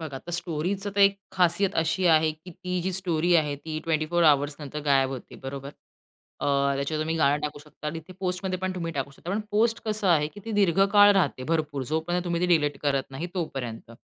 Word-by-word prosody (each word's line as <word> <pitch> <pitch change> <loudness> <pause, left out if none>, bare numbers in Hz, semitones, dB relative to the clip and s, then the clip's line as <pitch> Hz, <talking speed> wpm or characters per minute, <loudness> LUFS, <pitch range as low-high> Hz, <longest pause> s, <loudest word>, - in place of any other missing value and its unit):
बघा, 145 -5 -6
तर 175 - -10
स्टोरीचा 175 +4 -2
तर - - +3
एक 195 0 +6 0.2
खासियत 180 +2 +2
अशी 165 +3 +1
आहे, 160 -1 +5
की 160 +4 -14
ती 180 +1 -4
जी 185 +1 -1
स्टोरी 175 -2 +1
आहे 150 -3 +1
ती 155 +2 -5
24 165 +1 +1
अवर्स 145 -1 +3
नंतर 150 +1 -6
गायब 135 -2 +3
होते, 130 -3 -8
बरोबर? 135 +1 -7 0.7
अं, 140 -1 +2
त्याच्यावर 140 +3 -2
तुम्ही 160 +1 -2
गाणं 145 -1 +3
टाकू 150 -1 -4
शकता 150 0 -11
आणि 165 +2 -3
तिथे 175 +4 -14
पोस्टमध्ये 185 0 -2
पण 185 0 -2
तुम्ही 165 -2 -4
टाकू 140 -1 -3
शकता 170 +5 -9
पण 205 - 0
पोस्ट 225 +2 +2
कसं 215 -2 0
आहे, 155 -4 +4
की 205 - -13
ती 225 - -5
दीर्घकाळ 200 +1 +5
राहते, 185 -9 +1
भरपूर 150 -2 -1
जोपर्यंत 175 +3 -1
तुम्ही 170 -1 -1
ती 180 - +2
डिलीट 150 -5 +2
करत 140 -2 +1
नाही 145 +6 -5
तोपर्यंत 125 -11 -5
165 Hz, 210 wpm, -26 LUFS, 145-185 Hz, 0.7 s, एक